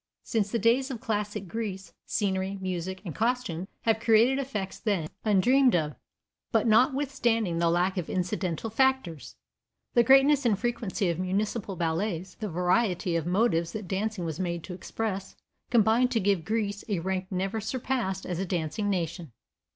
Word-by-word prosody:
Since 215 -4 0
the 235 - 0
days 235 +5 +2
of 250 -4 -5
classic 210 -4 -3
Greece, 195 -1 -5
scenery, 195 -2 -1
music 185 0 -4
and 170 - -4
costume 225 - -1
have 225 -1 +2
created 230 +4 +4
effects 210 -9 -4
then 195 -8 0 0.2
undreamed 245 +5 +4
of, 150 -3 0 0.6
but - - +2
notwithstanding 235 - +2
the 170 0 +3
lack 180 +3 +1
of 170 - -5
incidental 185 +2 -2
factors, 265 - 0 0.6
the 240 - +6
greatness 270 +3 +5
and 225 -5 +2
frequency 225 -4 -1
of 170 0 -2
municipal 195 +2 -1
ballets, 170 +2 -2
the 215 -3 -3
variety 180 0 +1
of 165 -1 -1
motives 175 -3 +1
that 215 -3 -5
dancing 195 0 -2
was 160 0 -4
made 170 -2 -2
to 180 - -7
express, 195 +1 -4 0.3
combine 230 +1 +4
to 250 -2 0
give 195 -5 +1
Greece 205 -1 -1
a 200 - +1
rank 185 +2 -2
never 195 +3 -2
surpassed 225 -4 -2
as 180 -2 -3
a - - 0
dancing 175 +4 -1
nation. 170 -5 -2
200 Hz, 160 wpm, -28 LUFS, 180-230 Hz, 0.6 s, the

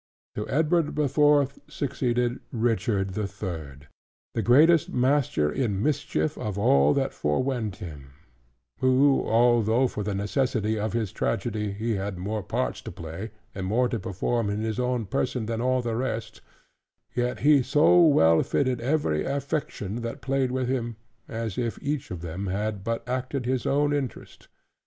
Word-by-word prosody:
To 105 - -5
Edward 160 +2 +1
the 150 -1 +2
Fourth 145 -1 +3
succeeded 125 -4 -1
Richard 110 -4 0
the 105 +2 -2
Third, 80 -8 -7 0.5
the - - 0
greatest 155 +6 +5
master 125 - +1
in 105 -7 -1
mischief 150 +1 -1
of 105 -2 -3
all 70 -7 +4
that - - 0
fore 75 +11 0
went 120 -7 -2
him: 70 -7 -10 0.7
who 130 +2 +4
although, 120 +1 +4
for 105 - -5
the 105 -1 -2
necessity 110 0 0
of 110 +1 -2
his 110 -5 -1
tragedy, 105 0 -2
he 110 +1 -2
had 95 -1 -4
more 105 +4 -3
parts - - -2
to - - -7
play, 85 +7 -7 0.2
and 95 -1 -4
more 120 +5 +2
to 115 - -2
perform 100 +4 -1
in 105 +1 -2
his 110 +1 -2
own 125 -2 0
person, 120 +4 -1
than 115 +1 -2
all 130 0 +1
the 115 -1 -2
rest; 115 -2 -3 0.7
yet 125 0 -1
he 145 -1 +6
so 150 +7 +5
well 80 - +5
fitted 130 -4 0
every 125 - 0
affection 135 -6 -3
that 115 0 -5
played 135 -1 0
with 130 0 -1
him, 120 -3 -2 0.3
as 115 0 -4
if 120 -2 -2
each 145 -2 -3
of 90 -3 -6
them 90 +4 -5
had 100 +1 -2
but 115 +2 -3
acted 130 +1 -2
his 130 -1 -1
own 145 +1 +2
interest. 140 -4 -5
115 Hz, 160 wpm, -26 LUFS, 100-130 Hz, 0.7 s, he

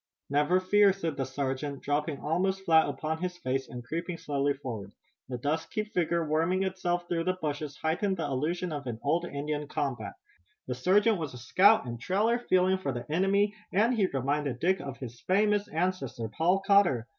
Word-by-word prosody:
"Never 150 +6 +3
fear," 200 +2 +5
said 165 -6 -3
the 135 -1 -2
sergeant, 135 +1 -3
dropping 145 0 -1
almost 190 +5 0
flat 160 -3 +5
upon 155 +3 -3
his 180 -1 -3
face, 135 -4 -2
and 120 0 -7
creeping 170 +6 -4
slowly 145 -2 0
forward. 115 -8 -7 0.4
The 125 - -3
dusky 160 - -2
figure 170 -5 -1
worming 165 +5 +1
itself 175 -2 -1
through 165 -1 -1
the 185 0 0
bushes 150 -2 -4
heightened 190 +5 0
the 165 - -2
illusion 155 +6 -2
of 145 -3 -5
an 115 -2 -4
old 165 +5 +1
Indian 150 -1 -3
combat. 120 -9 -3 0.5
The 125 - -3
sergeant 200 - +3
was 150 -6 -5
a - - -7
scout 185 - +4
and 120 -1 -6
trailer 215 - +1
feeling 185 -4 +2
for 140 -7 -2
the 120 -1 -5
enemy 200 +4 +2 0.2
and 220 +6 +3
he 210 -5 +2
reminded 140 -2 -1
Dick 190 +6 +2
of 140 -2 -6
his 120 -2 -8
famous 205 +2 +2
ancestor, 160 -9 -2
Paul 180 - +1
Cotter. 200 - +4
160 Hz, 180 wpm, -29 LUFS, 140-185 Hz, 0.5 s, fear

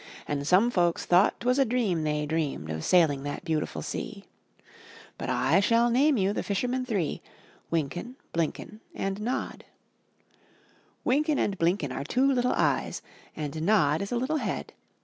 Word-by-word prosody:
And 145 -1 -2
some 200 +8 +4
folks 175 -5 +1
thought 180 +4 +4
'twas 250 +3 +2
a - - +6
dream 225 -9 0
they 150 -1 -1
dreamed 145 - -2
Of 80 0 -4
sailing 160 -6 +3
that 145 +5 -5
beautiful 160 -3 -2
sea - - -6 0.4
— - - -21
But - - -4
I 140 +9 +3
shall 230 +4 +3
name 275 +3 +4
you 195 0 +1
the - - -2
fishermen 250 +5 -1
three; 195 - -1 0.5
Wynken, 170 - -2 0.2
Blynken, 170 +6 -3 0.2
and 195 +1 -3
Nod. 245 +4 -3 1.4
Wynken 295 +3 +2
and 200 - 0
Blynken 165 -4 +1
are - - -3
two 250 - +1
little 250 -2 +2
eyes. - - 0 0.3
And 155 0 -4
Nod 165 -5 +3
is 200 - -4
a 245 - 0
little 265 +6 0
head. - - -4
190 Hz, 160 wpm, -27 LUFS, 155-245 Hz, 1.4 s, a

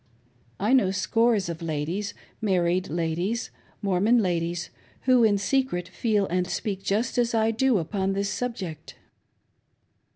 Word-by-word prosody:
I 210 +6 +2
know 255 -8 +5
scores 200 +3 +2
of 170 0 -5
ladies 165 +6 -3
— - - -35
married 180 0 +1
ladies— 170 +7 -1 0.3
Mormon 200 +5 +3
ladies; 175 -4 -1 0.3
who 255 -2 +4
in 210 -2 +4
secret 200 -5 0
feel 210 0 +1
and 180 0 -1
speak 195 +1 -3
just 215 +5 0
as 235 -1 +1
I 225 0 +3
do 245 +1 +2
upon 190 +3 -1
this 200 0 -1
subject. 185 -11 -5
195 Hz, 135 wpm, -26 LUFS, 175-225 Hz, 0.3 s, know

